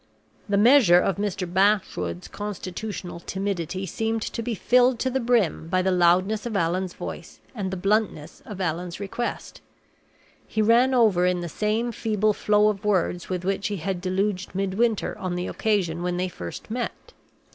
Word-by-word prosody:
The 200 Hz, -, +2 dB
measure 220 Hz, -5 st, +6 dB
of 190 Hz, +1 st, 0 dB
Mr. 200 Hz, -2 st, -2 dB
Bashwood's 180 Hz, -, 0 dB
constitutional 200 Hz, -2 st, -6 dB
timidity 190 Hz, -1 st, -3 dB
seemed 225 Hz, +4 st, -2 dB
to 230 Hz, -, -4 dB
be 230 Hz, 0 st, -3 dB
filled 250 Hz, +3 st, +3 dB
to 260 Hz, -, 0 dB
the 265 Hz, -, 0 dB
brim 230 Hz, -9 st, +1 dB
by 185 Hz, +1 st, +1 dB
the 190 Hz, -, +2 dB
loudness 185 Hz, +5 st, +3 dB
of 225 Hz, -, -4 dB
Allan's 180 Hz, +2 st, -1 dB
voice -, -, -8 dB
and 200 Hz, -6 st, -3 dB
the 190 Hz, -, -4 dB
bluntness 195 Hz, -5 st, -1 dB
of 205 Hz, -3 st, -8 dB
Allan's 175 Hz, 0 st, -3 dB
request. 205 Hz, +4 st, -5 dB, 0.9 s
He -, -, -4 dB
ran 235 Hz, +4 st, +4 dB
over 200 Hz, -7 st, +4 dB
in 180 Hz, -1 st, 0 dB
the 175 Hz, -, -4 dB
same 215 Hz, +7 st, -1 dB
feeble 215 Hz, -2 st, 0 dB
flow 210 Hz, +1 st, +3 dB
of 205 Hz, -1 st, -3 dB
words 180 Hz, -4 st, 0 dB
with 180 Hz, -1 st, -3 dB
which 195 Hz, +1 st, 0 dB
he 205 Hz, -1 st, -3 dB
had 180 Hz, +1 st, -3 dB
deluged 190 Hz, +1 st, -1 dB
Midwinter 195 Hz, +3 st, 0 dB
on 185 Hz, -1 st, -3 dB
the 180 Hz, 0 st, -2 dB
occasion 185 Hz, -6 st, 0 dB
when 175 Hz, 0 st, -1 dB
they 185 Hz, +1 st, -1 dB
first 85 Hz, -, -8 dB
met. 240 Hz, +1 st, -5 dB
195 Hz, 170 wpm, -25 LUFS, 180-215 Hz, 0.9 s, measure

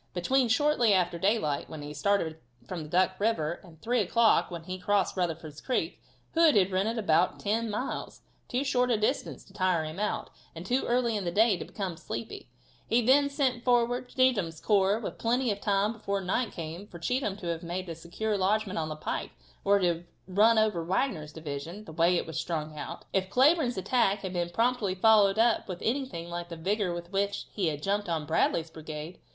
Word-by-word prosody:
Between 255 Hz, +9 st, +2 dB
"shortly 245 Hz, -4 st, +3 dB
after 175 Hz, -2 st, 0 dB
daylight," 190 Hz, -7 st, 0 dB
when 155 Hz, -2 st, -7 dB
he 145 Hz, 0 st, -7 dB
started 160 Hz, 0 st, 0 dB, 0.3 s
from 160 Hz, -3 st, -5 dB
Duck 185 Hz, +2 st, +2 dB
river, 175 Hz, -7 st, 0 dB
and 165 Hz, -4 st, -16 dB
3 245 Hz, +2 st, +1 dB
o'clock, 225 Hz, +3 st, +3 dB
when 170 Hz, -2 st, -7 dB
he 185 Hz, +2 st, -5 dB
had -, -, -16 dB
crossed 205 Hz, -1 st, +1 dB
Rutherford's 165 Hz, -4 st, -3 dB
creek. 255 Hz, -, -2 dB, 0.3 s
Hood 325 Hz, -5 st, +5 dB
had 195 Hz, -2 st, +4 dB
ridden 200 Hz, +5 st, 0 dB
about 180 Hz, -4 st, +2 dB
ten 225 Hz, +2 st, -1 dB
miles 215 Hz, +5 st, -4 dB, 0.3 s
too 250 Hz, +3 st, -1 dB
short 250 Hz, -2 st, +1 dB
a 235 Hz, -, +3 dB
distance 215 Hz, +6 st, -1 dB
to -, -, -20 dB
tire 185 Hz, -4 st, +1 dB
him 155 Hz, +4 st, -6 dB
out, 210 Hz, 0 st, -2 dB, 0.2 s
and 165 Hz, +2 st, -7 dB
too 250 Hz, +6 st, 0 dB
early 240 Hz, -2 st, +1 dB
in 205 Hz, -, -2 dB
the 175 Hz, -, -1 dB
day 215 Hz, +2 st, +4 dB
to -, -, -6 dB
become 190 Hz, -5 st, -5 dB
sleepy. 115 Hz, -2 st, -7 dB, 0.4 s
He 235 Hz, +1 st, +3 dB
then 280 Hz, +4 st, +5 dB
sent 260 Hz, -4 st, 0 dB
forward 245 Hz, 0 st, +2 dB
Cheatham's 215 Hz, -, +1 dB
corps 200 Hz, 0 st, +3 dB
with 225 Hz, -, -6 dB
plenty 240 Hz, +1 st, +1 dB
of 200 Hz, 0 st, -4 dB
time 205 Hz, +2 st, +1 dB
before 200 Hz, -3 st, -2 dB
night 195 Hz, +6 st, -1 dB
came 170 Hz, +4 st, -7 dB
for 175 Hz, -, -10 dB
Cheatham 210 Hz, +3 st, -1 dB
to 200 Hz, -, -9 dB
have 165 Hz, -1 st, -2 dB
made 180 Hz, +2 st, -4 dB
a 165 Hz, -, -4 dB
secure 175 Hz, +7 st, -3 dB
lodgement 200 Hz, 0 st, +1 dB
on 155 Hz, -1 st, -2 dB
the 155 Hz, -, -4 dB
pike, 155 Hz, -, -4 dB, 0.3 s
or 200 Hz, 0 st, +4 dB
to 190 Hz, -, +1 dB
have 170 Hz, 0 st, -1 dB, 0.2 s
run 215 Hz, +5 st, +4 dB
over 215 Hz, -6 st, +2 dB
Wagner's 165 Hz, -, -1 dB
division, 160 Hz, +6 st, -7 dB
the -, -, -9 dB
way 170 Hz, +2 st, +3 dB
it -, -, -1 dB
was 160 Hz, -2 st, -4 dB
strung 155 Hz, -2 st, -3 dB
out, 150 Hz, -, -7 dB
if 190 Hz, -1 st, 0 dB
Cleburne's 265 Hz, -, +3 dB
attack 200 Hz, -1 st, +1 dB
had 190 Hz, -1 st, -5 dB
been 175 Hz, -1 st, -1 dB
promptly 225 Hz, 0 st, +1 dB
followed 205 Hz, 0 st, +5 dB
up 230 Hz, 0 st, +3 dB
with 180 Hz, -3 st, -5 dB
anything 235 Hz, -9 st, -2 dB
like 175 Hz, 0 st, -5 dB
the 170 Hz, -, -6 dB
vigor 195 Hz, +3 st, 0 dB
with 175 Hz, +1 st, -6 dB
which 200 Hz, +1 st, -1 dB
he 195 Hz, -5 st, -1 dB
had 150 Hz, -1 st, -3 dB
jumped 200 Hz, -1 st, 0 dB
on 160 Hz, -3 st, -1 dB
Bradley's 160 Hz, +1 st, +1 dB
brigade. 155 Hz, +1 st, -8 dB
195 Hz, 205 wpm, -29 LUFS, 170-230 Hz, 0.4 s, Hood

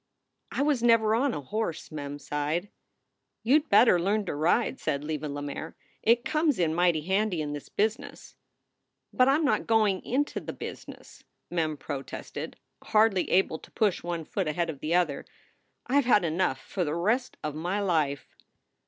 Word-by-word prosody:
"I 275 Hz, -, 0 dB
was 290 Hz, -5 st, +1 dB
never 230 Hz, -2 st, +4 dB
on 255 Hz, +3 st, +1 dB
a -, -, -4 dB
horse," 170 Hz, +2 st, -4 dB
Mem 145 Hz, -2 st, -5 dB
sighed. 150 Hz, +6 st, -2 dB, 0.7 s
"You 265 Hz, +7 st, +5 dB
d 305 Hz, -, -15 dB
better 205 Hz, -3 st, +6 dB
learn 200 Hz, +4 st, 0 dB
to -, -, -3 dB
ride," 175 Hz, -, +1 dB
said 140 Hz, 0 st, -2 dB
Leva 150 Hz, -1 st, -3 dB
Lemaire. 145 Hz, 0 st, -5 dB, 0.3 s
"It 235 Hz, +2 st, +3 dB
comes 305 Hz, -2 st, +1 dB
in 165 Hz, -3 st, +1 dB
mighty 175 Hz, -2 st, +2 dB
handy 190 Hz, +2 st, 0 dB
in 150 Hz, -1 st, -3 dB
this 145 Hz, -, -8 dB
business." 225 Hz, +7 st, -3 dB, 0.8 s
"But 255 Hz, -1 st, +4 dB
I 275 Hz, -, +5 dB
m 310 Hz, +1 st, +1 dB
not 285 Hz, -, +1 dB
going 215 Hz, -4 st, +2 dB
into 285 Hz, +4 st, -1 dB
the -, -, -7 dB
business!" -, -, -10 dB, 0.3 s
Mem 160 Hz, -3 st, -1 dB
protested, 135 Hz, -1 st, -6 dB, 0.3 s
hardly 215 Hz, -3 st, +3 dB
able 180 Hz, -4 st, +2 dB
to -, -, -15 dB
push 210 Hz, -4 st, +1 dB
one 170 Hz, -2 st, -4 dB
foot 190 Hz, 0 st, -2 dB
ahead 165 Hz, +2 st, -1 dB
of 145 Hz, -, -12 dB
the 155 Hz, +4 st, 0 dB
other. 165 Hz, -6 st, +1 dB, 0.6 s
"I 280 Hz, +3 st, +3 dB
ve 250 Hz, -, -7 dB
had 210 Hz, -7 st, +5 dB
enough 165 Hz, -4 st, 0 dB
for 185 Hz, -, -3 dB
the 150 Hz, -1 st, -2 dB
rest 230 Hz, +9 st, 0 dB
of 150 Hz, -, -2 dB
my 175 Hz, +6 st, -2 dB
life." 155 Hz, -8 st, -1 dB
180 Hz, 175 wpm, -28 LUFS, 155-225 Hz, 0.8 s, better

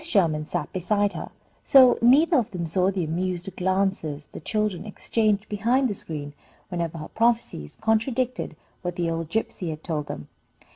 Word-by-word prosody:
Sherman 170 Hz, -, +2 dB
sat -, -, -3 dB
beside 205 Hz, +3 st, +1 dB
her, -, -, -6 dB, 0.3 s
so 260 Hz, -3 st, +7 dB
neither 290 Hz, +8 st, +6 dB
of 235 Hz, -5 st, +1 dB
them 180 Hz, -3 st, -4 dB
saw 180 Hz, +3 st, +2 dB
the 190 Hz, -2 st, -1 dB
amused 180 Hz, +3 st, -2 dB
glances 185 Hz, -6 st, 0 dB
the -, -, -10 dB
children 210 Hz, +1 st, -1 dB
exchanged 210 Hz, 0 st, 0 dB
behind 235 Hz, +6 st, +2 dB
the 215 Hz, -, -2 dB
screen, 150 Hz, -6 st, -6 dB, 0.4 s
whenever 170 Hz, -3 st, -3 dB
her 155 Hz, -, -6 dB
prophecies 230 Hz, -, 0 dB
contradicted 230 Hz, +3 st, 0 dB, 0.3 s
what 175 Hz, -1 st, -3 dB
the 170 Hz, -2 st, 0 dB
old 165 Hz, -1 st, -3 dB
gypsy 190 Hz, -4 st, -2 dB
had 155 Hz, 0 st, -6 dB
told 150 Hz, -4 st, -2 dB
them. 75 Hz, -, -6 dB
190 Hz, 160 wpm, -25 LUFS, 165-220 Hz, 0.4 s, so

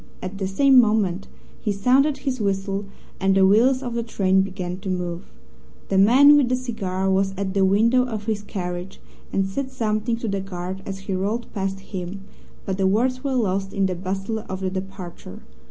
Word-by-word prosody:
At 190 Hz, +2 st, -6 dB
the 190 Hz, -, -1 dB
same 265 Hz, +6 st, +6 dB
moment 205 Hz, -5 st, 0 dB, 0.3 s
he 210 Hz, -, -1 dB
sounded 260 Hz, +8 st, +3 dB
his 255 Hz, -4 st, -1 dB
whistle 195 Hz, 0 st, -1 dB, 0.3 s
and 195 Hz, 0 st, +2 dB
the 190 Hz, 0 st, +5 dB
wheels 250 Hz, +7 st, +4 dB
of 245 Hz, -2 st, -4 dB
the 235 Hz, -, -1 dB
train 190 Hz, -4 st, +2 dB
began 185 Hz, -2 st, -4 dB
to 195 Hz, 0 st, -6 dB
move. 180 Hz, -1 st, -3 dB, 0.6 s
The 195 Hz, -, +3 dB
man 265 Hz, +9 st, +7 dB
with 280 Hz, -4 st, +3 dB
the 255 Hz, -, +2 dB
cigar 205 Hz, -7 st, -3 dB
was 190 Hz, 0 st, +1 dB
at 190 Hz, -1 st, -2 dB
the 195 Hz, -1 st, +2 dB
window 230 Hz, +6 st, +3 dB
of 220 Hz, -4 st, -4 dB
his 215 Hz, -2 st, -1 dB
carriage, 180 Hz, -3 st, -5 dB, 0.3 s
and 195 Hz, -, +1 dB
said 260 Hz, +8 st, -3 dB
something 230 Hz, -2 st, -1 dB
to 230 Hz, -, -4 dB
the 200 Hz, -1 st, -1 dB
guard 185 Hz, 0 st, -6 dB
as 195 Hz, 0 st, -5 dB
he 195 Hz, 0 st, -4 dB
rolled 205 Hz, +6 st, -2 dB
past 195 Hz, -1 st, -3 dB
him, 190 Hz, 0 st, -6 dB, 0.4 s
but 190 Hz, 0 st, -3 dB
the 190 Hz, -, +3 dB
words 255 Hz, +6 st, +1 dB
were 275 Hz, -2 st, -1 dB
lost 195 Hz, -4 st, 0 dB
in 195 Hz, -1 st, +1 dB
the 185 Hz, -, 0 dB
bustle 195 Hz, +4 st, -3 dB
of 190 Hz, 0 st, -4 dB
the 190 Hz, -1 st, -1 dB
departure. 190 Hz, -, -7 dB
195 Hz, 195 wpm, -23 LUFS, 190-230 Hz, 0.6 s, man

